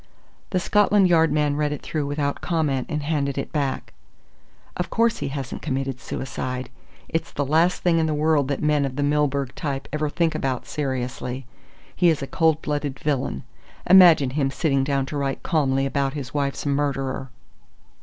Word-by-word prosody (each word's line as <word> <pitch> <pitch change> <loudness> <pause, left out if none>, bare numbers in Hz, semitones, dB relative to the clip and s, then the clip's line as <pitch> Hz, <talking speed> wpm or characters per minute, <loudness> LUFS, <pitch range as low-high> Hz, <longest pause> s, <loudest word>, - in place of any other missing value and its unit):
The 185 - +1
Scotland 205 +1 +4
Yard 165 -3 +4
man 150 -1 +1
read 150 0 0
it 150 - -5
through 150 -3 -2
without 145 0 -2
comment 150 -7 0
and 150 -2 -2
handed 145 -3 -1
it 140 - -3
back. 140 -3 -2 0.8
"Of 180 - -3
course 230 -1 +1
he - - -2
hasn't 135 -2 -5
committed 135 -1 -2
suicide. 130 -1 -5 0.4
It's 165 - -2
the 145 - -2
last 165 +6 +2
thing 170 -2 +3
in 160 - +1
the 155 - 0
world 150 -2 +2
that 140 +1 -2
men 150 -1 +2
of 135 -2 -3
the 145 - -1
Milburgh 140 -2 +1
type 140 -3 -4
ever 150 0 0
think 165 +1 0
about 130 -2 -2
seriously. 130 -2 -3 0.5
He 175 -1 +4
is 155 -4 0
a - - -1
cold 160 +1 +1
blooded 145 -2 -2
villain. 140 -2 -1 0.4
Imagine 175 -8 +7
him 135 -1 0
sitting 135 -1 +1
down 135 -1 0
to 145 +2 -5
write 140 -1 -2
calmly 135 -5 +1
about 135 0 0
his 135 -4 -6
wife's 140 -1 -2
murderer!" 135 -2 -1
145 Hz, 175 wpm, -23 LUFS, 135-155 Hz, 0.8 s, Imagine